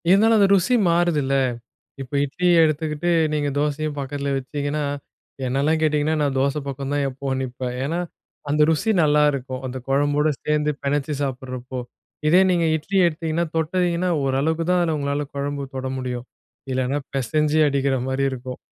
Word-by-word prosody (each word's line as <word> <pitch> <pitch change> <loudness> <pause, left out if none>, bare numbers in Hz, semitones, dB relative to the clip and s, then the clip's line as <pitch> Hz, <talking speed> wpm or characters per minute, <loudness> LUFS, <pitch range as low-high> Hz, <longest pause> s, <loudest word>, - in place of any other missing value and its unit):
இருந்தாலும், 220 +4 +5
அந்த 200 - +5
ருசி 195 +6 +2
மாறுதுல்ல. 170 -5 +2 0.7
இப்ப 135 +1 -9
இட்லிய 170 +4 +3
எடுத்துக்கிட்டு, 155 +1 -1 0.2
நீங்க 145 -1 0
தோசையும் 150 +1 -1
பக்கத்துலா 140 +1 -3
வச்சீங்கன்னா, 145 +3 -3 0.6
என்னல்லா 135 +5 +1
கேட்டீங்கன்னா, 155 0 +2
நான் 140 -2 0
தோச 140 +2 +1
பக்கம் 135 0 -4
தான் 145 -1 +1
எப்பவும் 135 0 -3
நிப்பேன். 125 -1 -4
ஏன்னா, 165 +5 -1 0.5
அந்த 150 +1 +2
ருசி 160 +8 +1
நல்லாருக்கும், 145 -4 +1
அந்த 130 +1 -5
குழம்போடு 145 +2 +2
சேந்து 150 0 +1
பெனச்சி 145 +1 -1
சாப்புட்றபோ. 130 -1 -4 0.5
இதே 180 +4 +6
நீங்க 170 -2 +2
இட்லி 185 +6 -3
எடுத்தீங்கன்னா, 165 +1 -1
தொட்டிங்கனா 175 +2 0
ஓரளவுக்கு 145 +5 0
தான் 180 -1 +3
அதுல 165 -3 0
உங்களால 140 +1 -1
கொழம்பு 140 0 -3
தொட 130 0 -3
முடியும். 125 -1 -4 0.4
இல்லனா, 130 +2 0 0.2
பெசஞ்சி 150 +4 +1
அடிக்கிற 140 -1 +1
மாரி 130 +1 -1
இருக்கும். 130 0 -6
145 Hz, 145 wpm, -22 LUFS, 135-155 Hz, 0.7 s, இதே